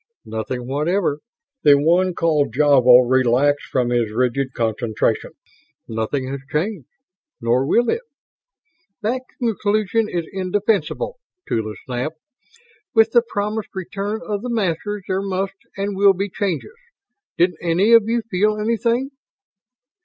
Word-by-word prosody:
"Nothing 110 +3 -4
whatever." 150 +3 0 0.4
The 145 -5 +6
one 175 +5 +2
called 155 -5 +1
Javo 125 -4 +6
relaxed 130 +3 +2
from 125 -2 +1
his 120 -3 +1
rigid 125 +3 0
concentration. 110 -1 -1 0.5
"Nothing 115 +4 -2
has 140 - -4
changed. 160 - -2 0.5
Nor 120 +3 +1
will 240 +8 +3
it." 460 - 0 1.0
"That 245 +4 0 0.2
conclusion 215 -2 0
is 170 -2 -2
indefensible!" 205 - -1 0.3
Tula 110 -1 -2
snapped. 130 +5 -3 0.8
"With 225 0 +5
the 240 - +5
promised 210 -2 -4
return 200 +3 -4
of 205 -1 -3
the 250 - -5
Masters 205 -2 -2
there 190 +1 0
must 195 0 -2 0.2
and 200 0 -2
will 200 0 +5
be 200 +2 -3
changes. 200 - -3 0.6
Didn't 180 +1 +2
any 180 +6 +3
of 225 -1 +6
you 235 0 0
feel 210 0 +1
anything?" 235 +4 0
185 Hz, 125 wpm, -21 LUFS, 135-210 Hz, 1.0 s, The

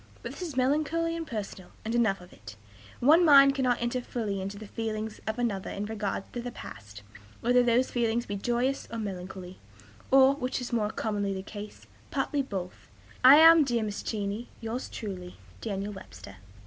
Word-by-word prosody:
But - - -5
this - - -10
is 320 -7 -5
melancholy 310 +5 +1
and 330 -1 -5
personal, 205 -6 -6 0.2
and 225 - -2
enough 220 -6 +2
of 180 - -15
it. 90 - -12 0.5
One 310 +8 +6
mind 275 -3 +8
cannot 255 -3 +1
enter 240 +1 -1
fully 210 -6 -3
into 195 +2 -5
the 215 - -8
feelings 220 0 -4
of 220 +1 -2
another 220 -6 -2
in 200 - -4
regard 210 -3 -3
to 240 - -3
the 245 - -5
past, 105 - -10 0.4
whether 245 +1 +4
those 245 +1 +2
feelings 235 -1 0
be 200 - -4
joyous 245 +6 -1
or 230 - -4
melancholy, 185 -3 -6 0.5
or, 270 0 +6
which 260 -2 -3
is 250 -1 -6
more 215 -3 +1
commonly 205 -3 -2
the 190 - -5
case, 210 +1 -9 0.2
partly 290 -3 0
both. 190 -8 -6 0.4
I 260 +2 +10
am, 325 +1 +8
dear 240 -4 0
Mrs. 210 -1 -4
Cheney, 210 +2 -3
yours 230 +3 -4
truly, 185 -4 -7 0.3
"DANIEL 200 - -3
WEBSTER." 100 - -11
225 Hz, 180 wpm, -28 LUFS, 200-255 Hz, 0.5 s, I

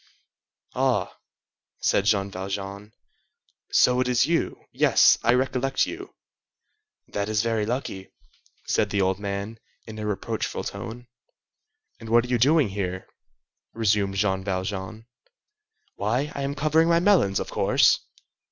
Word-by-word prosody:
"Ah!" - - 0 0.6
said 100 - +1
Jean 100 -2 +1
Valjean, 100 +2 -6 0.8
"so 125 0 +4
it 130 - 0
is 125 -2 +3
you? 170 0 -1
Yes, - - +4
I 120 - +3
recollect 130 +1 0
you." - - -8 0.9
"That 100 +1 -3
is 110 0 +1
very 110 -2 0
lucky," 110 -6 -4 0.6
said - - +1
the 100 - -1
old 95 0 +1
man, 100 +2 -5 0.3
in 110 -1 -9
a 105 - -3
reproachful 105 -2 -3
tone. 120 +1 -7 0.9
"And 115 - -10
what 120 +1 +4
are - - -9
you 125 -1 +1
doing 145 0 +4
here?" 95 -2 -4 0.7
resumed 105 -3 +1
Jean 95 -1 0
Valjean. 95 +3 -4 0.9
"Why, 125 +9 -1
I 140 - -5
am 140 +1 -2
covering 155 +3 +2
my 170 0 +4
melons, 170 - +3
of - - -5
course!" - - +3
110 Hz, 135 wpm, -25 LUFS, 100-125 Hz, 0.9 s, so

